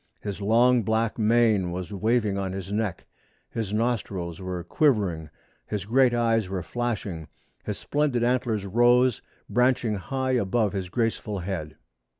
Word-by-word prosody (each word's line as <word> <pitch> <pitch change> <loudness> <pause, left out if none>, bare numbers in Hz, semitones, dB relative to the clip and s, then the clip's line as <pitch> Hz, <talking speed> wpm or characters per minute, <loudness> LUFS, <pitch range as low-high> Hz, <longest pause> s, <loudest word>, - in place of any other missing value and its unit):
His 100 -1 -5
long 120 +4 +4
black 110 +2 0
mane 110 -4 +3
was 90 +3 -5
waving 110 0 +1
on 95 -1 -2
his 95 0 -6
neck; 105 -4 -2 0.5
his 110 -4 -3
nostrils 100 -6 -2
were 90 -2 -4
quivering; 95 - +1 0.4
his 105 -3 -3
great 125 +3 +4
eyes 115 -4 +1
were 95 -2 -3
flashing; 100 -6 -3 0.4
his - - -4
splendid 145 -5 0
antlers 120 -4 0
rose, 120 +3 +3 0.3
branching 125 0 +2
high 130 +7 -2
above 110 -3 +1
his 95 -3 -3
graceful 115 -1 -1
head. 85 -5 -4
110 Hz, 140 wpm, -26 LUFS, 95-120 Hz, 0.5 s, long